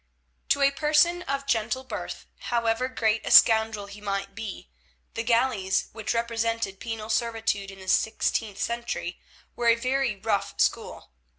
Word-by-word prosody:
To 280 - +3
a 275 - +5
person 310 +4 +3
of 275 -4 -3
gentle 235 0 0
birth, 260 - -6 0.2
however 230 +1 +1
great 220 -4 0
a - - -4
scoundrel 220 -2 +6
he 205 +1 -11
might 195 -1 -3
be, 220 -1 -7 0.4
the 225 - -2
galleys, 230 -5 +1
which 220 +1 -3
represented 230 -3 -1
penal 225 -2 -5
servitude 225 -4 -1
in 195 - -11
the 190 -1 -12
sixteenth 220 0 0
century, 235 -7 -3 0.4
were 240 - -1
a 230 - +6
very 255 -1 0
rough 200 0 -2
school. - - -1
225 Hz, 150 wpm, -26 LUFS, 210-240 Hz, 0.4 s, scoundrel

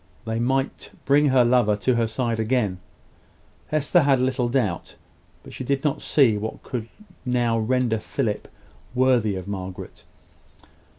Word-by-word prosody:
They 115 0 -2
might 135 +3 -1 0.2
bring 145 +2 +4
her 130 -3 +4
lover 120 -4 +3
to 125 +5 +1
her 115 -1 +1
side 115 0 -2
again, 110 -5 0 0.9
Hester 155 +3 +2
had 140 -3 +3
little 130 -1 0
doubt: 115 -9 -1 0.5
but - - -12
she - - -6
did 135 +1 -1
not 150 -3 0
see 125 -8 +3
what 110 +2 -6
could 115 -3 -5 0.3
now 120 -2 +1
render 120 0 +1
Philip - - -3 0.5
worthy 125 -5 +3
of 95 0 -6
Margaret. 95 -2 -7
120 Hz, 140 wpm, -24 LUFS, 110-130 Hz, 0.9 s, bring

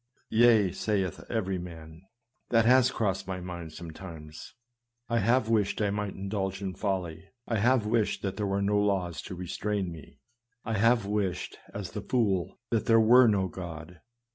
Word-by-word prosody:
" - - -40
Yea," 110 -4 +5
saith 95 -2 -2
every 95 -5 -1
man; 80 -2 -10 0.2
" 120 - -50
that 115 -2 +4
has 125 +1 +6
crossed 95 -6 -1
my 95 -1 -3
mind 85 -3 -7
sometimes. 80 -2 -10 0.5
I 115 0 +1
have 115 +3 +2
wished 105 -3 +1
I 105 -2 +1
might 105 -1 -3
indulge 95 -1 -3
in 95 -2 -4
folly; 95 -3 -3 0.2
I 115 - 0
have 120 +1 +3
wished 110 0 0
there 100 +1 -2
were 100 0 0
no 105 +1 +2
laws 95 -5 0
to 90 - -7
restrain 95 +1 -3
me; 80 -3 -12 0.5
I 115 - -2
have 115 0 +4
wished, 100 -3 -2
as 100 -4 -6
the 105 - -5
fool, 100 -8 0
that 115 -2 0
there 115 0 +6
were 120 +3 +7
no 100 -3 +2
God." 85 -1 -8
100 Hz, 170 wpm, -29 LUFS, 90-110 Hz, 0.5 s, were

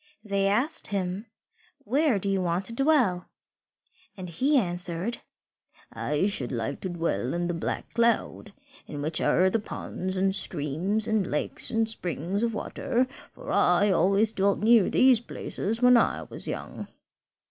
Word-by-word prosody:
They 200 -2 0
asked 240 +10 +1
him, 195 +1 -3 0.6
"Where 270 +1 +1
do 195 - -4
you 195 -1 0
want 175 +1 -1
to 230 - -2
dwell?" 250 - +1 0.9
And 185 -2 -7
he 270 - +1
answered, 180 +1 -1 0.7
"I 150 +5 -1
should 145 - +2
like 120 +3 -3
to 190 - -4
dwell 165 - -2
in 175 0 -1
the 175 - -2
Black 165 - -4
Cloud, 230 -2 0 0.4
in 145 -1 -6
which 155 +1 -1
are 185 - +3
the 225 - +1
ponds 185 -2 -5
and 190 +1 +1
streams 185 +4 0
and 220 -4 0
lakes 150 - -2
and 225 -1 0
springs 185 -2 -3
of 230 -2 -1
water, 240 +3 -1 0.3
for - - -9
I 185 +3 +3
always 195 +5 +3
dwelt 195 +1 +1
near 225 -2 +5
these 255 -3 +5
places 225 0 -4
when 250 0 +7
I 235 - +2
was - - -5
young." - - -6
195 Hz, 155 wpm, -26 LUFS, 175-225 Hz, 0.9 s, when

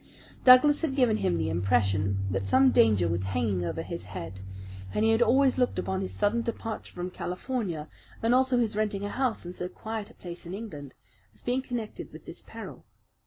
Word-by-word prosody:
Douglas 260 +4 +7
had 305 -5 -1
given 245 -5 +3
him 90 - +1
the 85 - -1
impression 95 +1 +1
that 95 0 -1
some 130 +5 +5
danger 105 -6 +4
was 85 +2 -1
hanging 95 -2 0
over 85 -1 -3
his 90 +2 -6
head, 95 0 -7 0.6
and 220 - +2
he 225 - +4
had 225 +1 +2
always 260 +2 +4
looked 250 - +1
upon 190 0 -1
his 190 - -3
sudden 210 +3 +1
departure 225 -1 -5
from 180 +1 -5
California, 180 - -3 0.4
and 230 +2 +3
also 260 0 +3
his 230 -3 +1
renting 210 -2 -1
a - - -3
house 250 -5 -1
in 175 - -6
so 180 0 -4
quiet 220 +2 -6
a - - -18
place 175 -1 -9
in 180 - -5
England, 150 - -8 0.4
as - - -16
being 250 +2 0
connected 240 -4 -5
with - - -12
this - - -9
peril. - - -10
190 Hz, 200 wpm, -28 LUFS, -, 0.6 s, Douglas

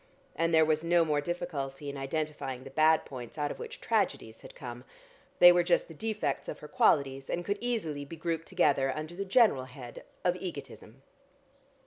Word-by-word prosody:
And 165 +1 +1
there 160 -1 +6
was 155 0 +1
no 170 0 +4
more 150 -2 +1
difficulty 145 -4 -4
in 140 - -4
identifying 135 -2 -3
the 135 - -10
bad 155 +2 +4
points, 125 0 -9
out 145 -1 -1
of - - -8
which 470 +2 -7
tragedies - - -1
had - - -13
come. - - -8 0.5
They 175 - +10
were 175 0 +4
just 175 0 +2
the 165 - -11
defects 205 -5 -2
of - - -5
her 150 - -10
qualities, 135 -3 +2
and 175 0 -2
could 200 0 -1
easily 195 -13 -2
be 145 +4 -9
grouped 165 0 -3
together 145 -7 +2
under 155 +2 -5
the 200 +3 -4
general 195 - +4
head 125 -2 -10 0.2
of 180 0 +2
egotism. 140 - -8
155 Hz, 185 wpm, -30 LUFS, 140-175 Hz, 0.5 s, They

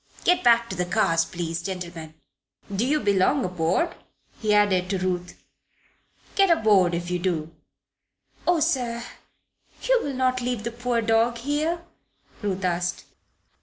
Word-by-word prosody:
Get 360 +1 +3
back 235 -1 +5
to - - -3
the 180 0 -1
cars, 170 -4 +2
please, 170 -1 -4
gentlemen. 170 -3 -6 0.6
Do 225 +6 +1
you 300 +2 +2
belong 200 +7 +2
aboard?" 180 - 0 0.5
he 215 -2 +1
added, 200 -3 +3
to 195 - 0
Ruth. 180 -1 -3 0.9
"Get 390 -1 +4
aboard, 205 - +4
if 175 +1 -4
you 180 - 0
do." 165 -3 -2 0.9
"Oh, 350 -2 +3
sir! 235 -4 0 0.8
You - - +3
will 280 -2 -3
not 255 0 +1
leave 245 -3 -2
the 235 - -3
poor 240 0 -1
dog 225 +1 +2
here?" 305 +7 -1 0.6
Ruth 195 -3 -2
asked. 180 0 -1
210 Hz, 140 wpm, -25 LUFS, 180-250 Hz, 0.9 s, back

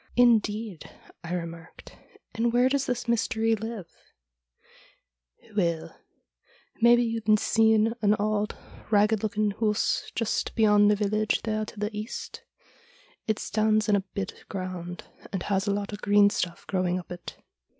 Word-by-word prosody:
' - - -26
Indeed! 215 -4 0 0.2
' - - -24
I 175 +1 -3
remarked; 165 -1 -8 0.2
' - - -28
and 230 +1 +1
where 245 +2 +4
does 275 0 0
this 245 -1 -2
Mystery 225 -1 +1
live? 220 -4 -6 0.7
' - - -28
' - - -26
Weel, 170 -5 -1 0.9
maybe 240 +1 +6
you've 225 -2 +2
seen 220 +1 +3
an 210 0 +4
auld 210 0 -1 0.3
ragged 210 0 +3
looking 210 -1 0
hoose 210 0 0
just 230 -1 -1
beyond 210 -2 +5
the 210 - +4
village 215 +1 0
there 215 -1 -1
to 210 - -11
the 210 +1 -3
east? 210 +2 -6 0.9
It 220 -1 +1
stands 215 0 +1
in 210 - +4
a - - +3 0.2
bit 195 -1 -5
ground, 180 -2 -5 0.3
and 190 -2 -3
has 195 0 0
a - - +2
lot 200 +1 -3
of 205 - -7
green 205 0 +5
stuff 175 -3 -3
growing 185 -2 0
up 180 - -8
it.' 175 -1 -8
210 Hz, 160 wpm, -27 LUFS, 195-220 Hz, 0.9 s, maybe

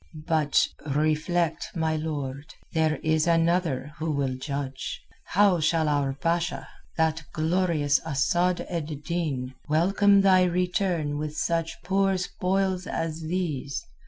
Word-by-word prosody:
"But 155 -3 +3 0.3
reflect, 155 +2 +1
my 160 -1 0
lord: 145 -2 -4 0.2
there 160 -2 +2
is 160 +1 +2
another 165 -4 +1
who 160 +1 -2
will 140 -3 0
judge. 135 0 -4 0.3
How 195 -2 +3
shall 160 0 +2
our 145 -2 +1
Basha, 170 +5 -1 0.3
the 160 0 +1
glorious 160 -3 +2
Asad 175 +4 +1
ed 155 -4 -4
Din, 145 -7 -2 0.2
welcome 195 +5 +4
thy 185 -2 +5
return 180 -4 0
with 150 0 -4
such 165 -1 -1
poor 195 0 +2
spoils 185 0 -1
as 165 0 -3
these? 155 -5 -3
160 Hz, 120 wpm, -26 LUFS, 150-180 Hz, 0.3 s, thy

